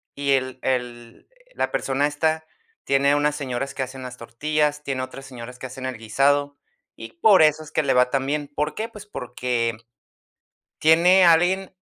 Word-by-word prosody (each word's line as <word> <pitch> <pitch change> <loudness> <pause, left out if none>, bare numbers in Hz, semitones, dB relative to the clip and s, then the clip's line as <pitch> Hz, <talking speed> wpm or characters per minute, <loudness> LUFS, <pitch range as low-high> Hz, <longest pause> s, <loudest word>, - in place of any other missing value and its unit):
y 140 0 -1
el 130 -1 0
el 120 -2 -4 0.3
la - - -1
persona 140 +2 0
esta, 155 +2 -1 0.4
tiene 140 +1 +3
unas 145 0 +1
señoras 135 -1 -4
que 130 - -1
hacen 130 +1 -8
las 125 0 -8
tortillas, 150 +5 -1
tiene 130 -2 -3
otras 135 +1 -9
señoras 125 -1 -10
que 130 - -6
hacen 130 +1 -8
el 130 -3 -5
guisado, 140 +5 +1 0.4
y - - -10
por 220 - +5
eso 155 0 +3
es 155 - -13
que 155 - +1
le 135 - +2
va 125 0 +4
tan 135 -1 0
bien. 145 0 -2
¿Por 150 +1 -1
qué? 220 - -3
Pues, 210 -1 -12
porque 120 - -2 1.0
tiene 175 +4 +5
alguien 180 +3 +3
140 Hz, 175 wpm, -23 LUFS, 125-155 Hz, 1.0 s, por